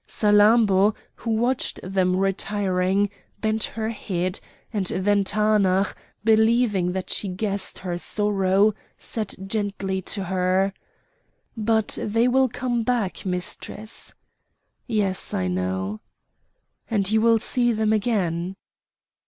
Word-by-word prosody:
Salammbô, 210 -1 +4 0.2
who 230 - -7
watched 240 +3 0
them 185 -1 +1
retiring, 195 0 +1 0.3
bent 220 0 0
her 220 -1 -4
head, 185 -4 -3 0.3
and 200 -4 -1
then 200 +2 +2
Taanach, 200 -2 +2 0.3
believing 220 -4 +3
that 185 -1 -3
she 205 - 0
guessed 195 +1 -3
her 175 -2 -4
sorrow, 205 +1 +2 0.2
said 215 -3 -4
gently 195 -2 -2
to 195 +2 -2
her: 185 +1 +1 0.8
"But 220 -1 +1
they 225 +3 +2
will 260 +1 +3
come 240 0 -1
back, 225 -5 -1
Mistress." 185 +4 -4 0.7
"Yes! 205 -5 0
I 95 - 0
know." 95 +3 -2 0.9
"And 205 -3 +1
you 220 0 +3
will 230 0 +5
see 240 +2 +1
them 220 -1 +1
again." 190 -5 0
205 Hz, 110 wpm, -24 LUFS, 185-220 Hz, 0.9 s, will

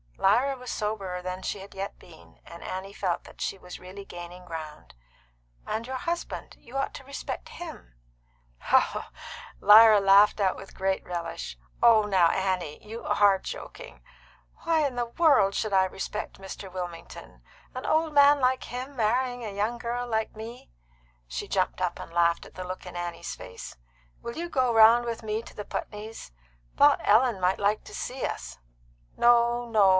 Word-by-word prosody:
Lyra 250 +8 +3
was 250 -1 -7
soberer 200 -4 -3
than 185 +1 -4
she 205 - -3
had 195 +1 -11
yet 195 +1 -5
been, 165 -2 -17
and 170 - -11
Annie 190 +2 -5
felt 185 -4 -2
that - - -15
she - - -2
was 180 -1 -10
really 190 +2 -10
gaining 175 0 -9
ground. 160 -3 -8 0.7
"And 225 +1 -3
your 260 +1 -5
husband; 340 +4 -4
you 245 +3 -8
ought 275 - -1
to - - -9
respect 280 - -6
him 345 - -10 0.8
" - - -1
Lyra 215 0 +9
laughed 200 +2 +6
out 190 -2 +2
with 195 - -12
great 190 0 -1
relish. 170 - -5 0.2
"Oh, 225 -2 +7
now, 190 -5 +4
Annie, 185 -5 -2
you 230 +2 -7
are 200 -2 +4
joking! - - -9 0.6
Why 325 -2 +2
in 270 -3 -2
the 240 -1 0
world 255 -8 +4
should 215 -2 -1
I 190 -1 +5
respect 195 +3 -5
Mr. 195 0 -8
Wilmington? 175 - -8 0.3
An 255 - -6
old 315 0 +1
man 285 0 +6
like 255 0 +1
him 255 +3 -6
marrying 245 +2 0
a 215 - -4
young 215 +4 -1
girl 240 +1 -3
like 220 -2 -1
me!" 225 - -9 0.6
She - - -5
jumped - - 0
up - - -1
and 165 - -9
laughed 170 0 +2
at - - -15
the 185 - -5
look 185 +1 -7
in 180 - -9
Annie's 175 - -5
face. - - -9 0.5
"Will 235 - -6
you 345 +1 -4
go 255 -5 +2
round 225 +2 +7
with 230 -1 -4
me 215 0 -2
to - - -13
the 210 - -6
Putneys? 215 - -6 0.5
thought - - +6
Ellen 225 0 +4
might 185 +1 +1
like 205 +1 +1
to - - -11
see 260 +1 -5
us." - - -6 0.6
"No, 240 0 +4
no. 215 -4 +4
210 Hz, 175 wpm, -27 LUFS, 185-245 Hz, 0.8 s, Lyra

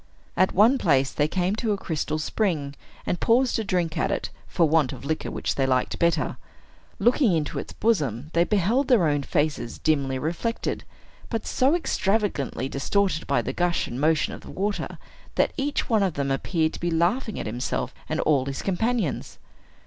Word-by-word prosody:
At 185 - +3
one 230 +8 +5
place 135 -5 +3
they 150 - +1
came 185 +4 0
to 220 -2 0
a - - -2
crystal 155 -4 -2
spring, 155 -4 -1 0.3
and 175 - -1
paused 245 +2 +3
to 225 - -1
drink 180 -5 -1
at - - +1
it - - -2 0.2
for 170 - +2
want 155 -4 +3
of - - -9
liquor 160 +2 -2
which - - -2
they 135 -1 0
liked 130 -1 0
better. 170 -3 +1 0.6
Looking 240 -4 +3
into 155 -3 -1
its - - -7
bosom, 150 - 0
they 170 - +4
beheld 210 +8 +1
their 235 -10 +4
own 145 -1 +1
faces 145 -4 -1
dimly 140 -4 +1
reflected, 170 - -2 0.4
but 225 -3 -3
so 270 +5 +2
extravagantly 195 - 0
distorted 175 +5 0
by - - +2
the - - -3
gush 175 -1 +1
and 120 +3 -5
motion 155 +1 +2
of - - -9
the - - -12
water, 205 +2 -3 0.4
that - - +2
each 285 0 -1
one 220 -3 +3
of 190 -5 0
them 140 -1 -1
appeared 160 +3 0
to - - -7
be 175 - -1
laughing 185 +8 0
at - - -4
himself 120 +2 -2 0.2
and 155 +1 -1
all 140 -4 +2
his 135 -1 -4
companions. 210 - -1
170 Hz, 185 wpm, -25 LUFS, 145-210 Hz, 0.6 s, one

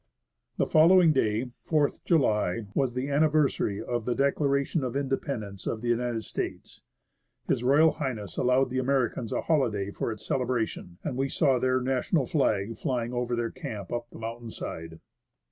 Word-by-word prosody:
The - - +2
following 165 +1 +6
day, 115 -1 0
4th 150 -3 +1
July, 110 - +2
was 130 -1 0
the 130 +2 -1
anniversary 145 -8 +2
of 120 -2 -3
the 125 - 0
Declaration 140 +1 +1
of 125 -1 -3
Independence 135 -7 -3
of 110 - -2
the 120 - -2
United 120 -1 0
States. - - -5 0.7
H.R. 145 +6 +4 0.3
H. 100 -2 -8
allowed 125 +1 +2
the 130 - 0
Americans 130 -3 0
a - - 0
holiday 110 -11 0
for 115 - -3
its 110 -1 -8
celebration; 120 -8 -2
and 145 - -3
we 135 +1 0
saw 135 -4 +2
their 130 +1 +2
national 130 +3 0
flag 110 -7 0
flying 125 -4 -2
over 120 0 -1
their 120 -1 -2
camp 100 -1 -6
up 120 0 -3
the - - -12
mountain 115 +1 -6
side. 80 -5 -7
125 Hz, 160 wpm, -28 LUFS, 115-140 Hz, 0.7 s, following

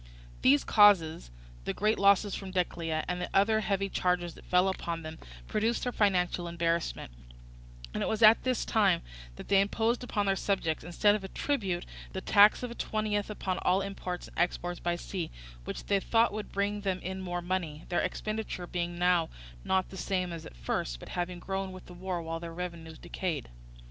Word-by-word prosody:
These 140 +2 +5
causes, 175 - +5 0.4
the - - -2
great 215 +2 +1
losses 200 0 +4
from 195 - -5
Decelea, 170 -3 -1
and 180 0 -2
the - - -3
other 220 +3 +4
heavy 195 -2 0
charges 180 -3 0
that - - -15
fell 180 +1 +3
upon 170 -3 -3
them, 155 0 -7 0.3
produced 225 +3 0
their 245 - 0
financial 180 -5 +1
embarrassment; 170 - -1 0.8
and - - -2
it - - 0
was 220 +1 0
at 220 +1 +8
this 255 -2 0
time 195 -6 +3 0.3
that - - -10
they 195 -1 +5
imposed 225 +4 0
upon 210 -4 -1
their 195 -1 +2
subjects, 190 -5 -1
instead 175 +5 +3
of 210 - -1
the 190 - -6
tribute, 190 -7 -1 0.3
the 190 - -2
tax 205 +4 +6
of 245 - -3
a - - -4
twentieth 215 -3 -1
upon 190 -3 -2
all 185 +2 +2
imports 185 -2 -5
and - - -9
exports 175 0 0
by 175 0 0
sea, 175 -1 -4 0.4
which - - -5
they 200 -1 +2
thought 225 +2 +2
would 215 0 -5
bring 205 +1 -1
them 190 -2 0
in 190 +1 -4
more 175 -1 -3
money; 170 -4 -3
their 175 - +1
expenditure 215 -4 -3
being 175 0 -3
now 175 -2 +3 0.3
not 190 0 +1
the 190 - -9
same 180 -1 -1
as 165 - -7
at - - -14
first, - - -2
but - - -10
having 180 0 -3
grown 190 +1 -3
with 185 0 -10
the 180 - -11
war 180 -1 -4
while 165 0 -4
their 170 0 -7
revenues 170 -3 -6
decayed. 165 -8 -4
185 Hz, 195 wpm, -30 LUFS, 175-205 Hz, 0.8 s, at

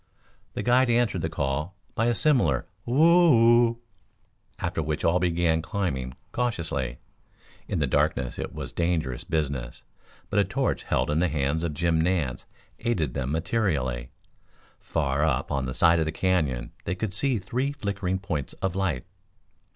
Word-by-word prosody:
The - - -2
guide 125 +1 +4
answered 115 -7 +2
the 80 - -1
call 75 +4 -2 0.2
by 115 - +1
a 120 - +2
similar 145 -2 +2 0.2
"whoo 125 -5 +6
oo," - - -27 0.8
after - - -2
which 75 0 -2
all 85 +2 +3
began 85 -2 +1
climbing 70 -10 -3 0.2
cautiously. 80 - -2 0.7
In - - -2
the - - +2
darkness 60 0 0
it - - -4
was - - -6
dangerous 80 -7 -1
business, 70 -6 -3 0.5
but - - +3
a - - +5
torch 95 0 -1
held - - 0
in 75 - +1
the 90 - +3
hands 75 +2 0
of 80 -3 -2
Jim 80 +1 +2
Nance 80 -7 0 0.3
aided 80 - -1
them 70 -1 -2
materially. 75 - -1 0.7
Far 70 -2 -1
up 70 -3 0
on 70 -2 -1
the 65 - -4
side 85 0 +5
of 80 - +1
the 80 - -1
Canyon 80 -9 0
they - - -1
could 100 0 -3
see 130 +4 +1
three 125 +8 -2
flickering 100 -8 -2
points 95 -8 -4
of 95 -2 -2
light. 90 -10 -1
85 Hz, 160 wpm, -26 LUFS, 70-105 Hz, 0.8 s, whoo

